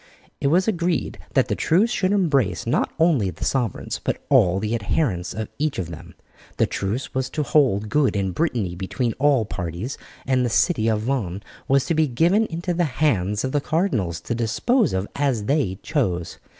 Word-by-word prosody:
It -, -, 0 dB
was 180 Hz, +7 st, +3 dB
agreed 175 Hz, -, -1 dB, 0.2 s
that -, -, +4 dB
the -, -, 0 dB
truce 200 Hz, +9 st, +2 dB
should 190 Hz, -5 st, +1 dB
embrace 140 Hz, -, +1 dB
not 115 Hz, -, 0 dB
only 160 Hz, -, +3 dB
the 80 Hz, -, -6 dB
sovereigns, 125 Hz, -8 st, -2 dB
but -, -, -1 dB
all 90 Hz, +1 st, +4 dB
the 110 Hz, +2 st, -2 dB
adherents 100 Hz, -, -1 dB
of 110 Hz, -1 st, -3 dB
each 150 Hz, -1 st, 0 dB
of 85 Hz, -3 st, -4 dB
them. 80 Hz, -, -10 dB, 0.4 s
The -, -, +4 dB
truce 105 Hz, +7 st, -3 dB
was 130 Hz, -1 st, -1 dB
to 150 Hz, -, -2 dB
hold 120 Hz, -7 st, +2 dB
good 140 Hz, 0 st, +2 dB
in 95 Hz, -2 st, 0 dB
Brittany 115 Hz, -, -1 dB
between 105 Hz, +6 st, -2 dB
all 140 Hz, -5 st, +3 dB
parties, 90 Hz, -, -5 dB, 0.3 s
and 130 Hz, -1 st, +2 dB
the 120 Hz, -, +1 dB
city 115 Hz, -1 st, +2 dB
of 110 Hz, -2 st, +1 dB
Vannes 110 Hz, -6 st, -2 dB, 0.2 s
was 135 Hz, 0 st, +3 dB
to 170 Hz, -, 0 dB
be 155 Hz, -1 st, +2 dB
given 175 Hz, -, +2 dB
into 170 Hz, +2 st, -3 dB
the 175 Hz, 0 st, +1 dB
hands 105 Hz, -9 st, +1 dB
of 130 Hz, -, -1 dB
the 145 Hz, -, +1 dB
cardinals 115 Hz, -, -1 dB
to -, -, -3 dB
dispose 190 Hz, -, +1 dB
of 95 Hz, +2 st, -1 dB
as 135 Hz, -7 st, 0 dB
they 130 Hz, -9 st, 0 dB
chose. 95 Hz, -, -1 dB
125 Hz, 190 wpm, -23 LUFS, 100-155 Hz, 0.4 s, that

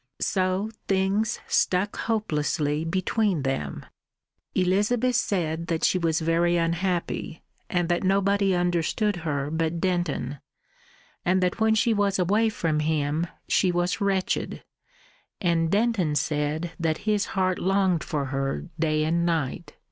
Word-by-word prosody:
So 190 Hz, +2 st, 0 dB, 0.2 s
things 195 Hz, +4 st, +1 dB
stuck 190 Hz, +3 st, +1 dB
hopelessly 155 Hz, -8 st, -1 dB
between 185 Hz, 0 st, 0 dB
them. 75 Hz, -, -3 dB, 0.7 s
Elizabeth 210 Hz, +7 st, +2 dB
said 170 Hz, -7 st, -1 dB
that 165 Hz, -1 st, -1 dB
she 185 Hz, -, +3 dB
was 165 Hz, -1 st, +1 dB
very 170 Hz, +2 st, +2 dB
unhappy, 170 Hz, 0 st, -1 dB, 0.3 s
and 175 Hz, -1 st, 0 dB
that 175 Hz, +1 st, +1 dB
nobody 195 Hz, 0 st, +2 dB
understood 175 Hz, +3 st, 0 dB
her 145 Hz, -4 st, -2 dB
but 165 Hz, +1 st, -1 dB
Denton, 165 Hz, -7 st, -1 dB, 0.8 s
and 185 Hz, +1 st, +2 dB
that 180 Hz, +4 st, 0 dB
when 220 Hz, 0 st, +3 dB
she 225 Hz, +1 st, +3 dB
was 205 Hz, -2 st, +1 dB
away 205 Hz, +5 st, +2 dB
from 165 Hz, -7 st, -1 dB
him 155 Hz, +1 st, 0 dB, 0.2 s
she 185 Hz, -, +3 dB
was 175 Hz, +2 st, -1 dB
wretched; 195 Hz, -2 st, -1 dB, 0.8 s
and 165 Hz, -2 st, +1 dB
Denton 205 Hz, -6 st, +1 dB
said 150 Hz, +3 st, -1 dB
that 160 Hz, -2 st, 0 dB
his 210 Hz, -2 st, +1 dB
heart 185 Hz, -1 st, +1 dB
longed 190 Hz, -3 st, +2 dB
for 145 Hz, -3 st, -2 dB
her 135 Hz, 0 st, -2 dB
day 155 Hz, -1 st, +1 dB
and 170 Hz, +2 st, +1 dB
night. 165 Hz, -1 st, -2 dB
175 Hz, 130 wpm, -26 LUFS, 160-195 Hz, 0.8 s, she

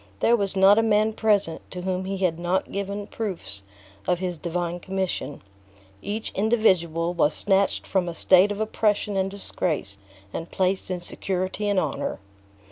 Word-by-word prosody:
There 235 Hz, -, +4 dB
was 200 Hz, -3 st, -1 dB
not 195 Hz, +3 st, +6 dB
a -, -, +5 dB
man 215 Hz, 0 st, +2 dB
present 205 Hz, -7 st, +1 dB
to 180 Hz, -1 st, -6 dB
whom 185 Hz, 0 st, -1 dB
he 195 Hz, +1 st, -3 dB
had 180 Hz, -3 st, 0 dB
not 175 Hz, +2 st, -1 dB
given 200 Hz, +1 st, -3 dB
proofs 175 Hz, -, -5 dB, 0.5 s
of 180 Hz, -, +2 dB
his 180 Hz, -2 st, -4 dB
divine 175 Hz, +1 st, -2 dB
commission; 185 Hz, -, -3 dB, 0.6 s
each 215 Hz, +2 st, -3 dB
individual 185 Hz, -6 st, +2 dB
was 150 Hz, -3 st, +2 dB
snatched 195 Hz, -1 st, +1 dB
from 185 Hz, -3 st, 0 dB
a 170 Hz, -, -6 dB
state 185 Hz, +4 st, +5 dB
of 205 Hz, -, -4 dB
oppression 210 Hz, -1 st, 0 dB
and 190 Hz, 0 st, +1 dB
disgrace, 160 Hz, -, -3 dB, 0.3 s
and 165 Hz, -, -5 dB
placed 190 Hz, 0 st, 0 dB
in 180 Hz, -1 st, -3 dB
security 185 Hz, +3 st, -1 dB
and 200 Hz, -2 st, +3 dB
honor. 150 Hz, -6 st, -2 dB
190 Hz, 160 wpm, -25 LUFS, 175-205 Hz, 0.6 s, not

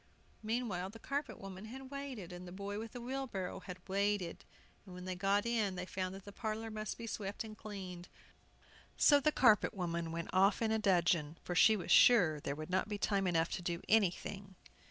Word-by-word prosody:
Meanwhile 215 Hz, -5 st, -2 dB
the 220 Hz, -, -11 dB
carpet 280 Hz, +4 st, -3 dB
woman 195 Hz, +1 st, -8 dB
had 260 Hz, +4 st, -9 dB
waited, 265 Hz, -11 st, -6 dB
and 180 Hz, +1 st, -8 dB
the -, -, -8 dB
boy 200 Hz, +2 st, -5 dB
with 225 Hz, 0 st, -7 dB
the 245 Hz, -, -6 dB
wheelbarrow 240 Hz, -8 st, -4 dB
had 180 Hz, -1 st, -8 dB
waited, 200 Hz, -2 st, -1 dB, 0.4 s
and 185 Hz, -3 st, -11 dB
when 180 Hz, 0 st, -8 dB
they 185 Hz, -, -2 dB
got 195 Hz, +3 st, +1 dB
in 220 Hz, -5 st, 0 dB
they 180 Hz, 0 st, -4 dB
found 185 Hz, 0 st, -3 dB
the 195 Hz, +1 st, -10 dB
parlor 220 Hz, +1 st, -4 dB
must 215 Hz, 0 st, -4 dB
be 230 Hz, -, -6 dB
swept 205 Hz, -2 st, -4 dB
and 215 Hz, -1 st, -9 dB
cleaned. 185 Hz, -5 st, -8 dB, 0.9 s
So 290 Hz, -1 st, +6 dB
the 305 Hz, +2 st, +2 dB
carpet 220 Hz, -6 st, +4 dB
woman 170 Hz, -3 st, -2 dB
went 170 Hz, 0 st, -4 dB
off 195 Hz, +2 st, +4 dB
in 225 Hz, -1 st, +1 dB
dudgeon, 170 Hz, -5 st, +2 dB
for 180 Hz, -, -3 dB
she 220 Hz, +4 st, +6 dB
was 185 Hz, -, -4 dB
sure 175 Hz, -11 st, +6 dB
there 140 Hz, -1 st, -3 dB
would 155 Hz, +3 st, -7 dB
not 190 Hz, +3 st, +1 dB
be 205 Hz, -, -2 dB
time 200 Hz, -1 st, +1 dB
enough 165 Hz, -1 st, +1 dB
to -, -, -3 dB
do 170 Hz, -1 st, -2 dB
anything. 195 Hz, -1 st, +1 dB
195 Hz, 195 wpm, -35 LUFS, 180-220 Hz, 0.9 s, So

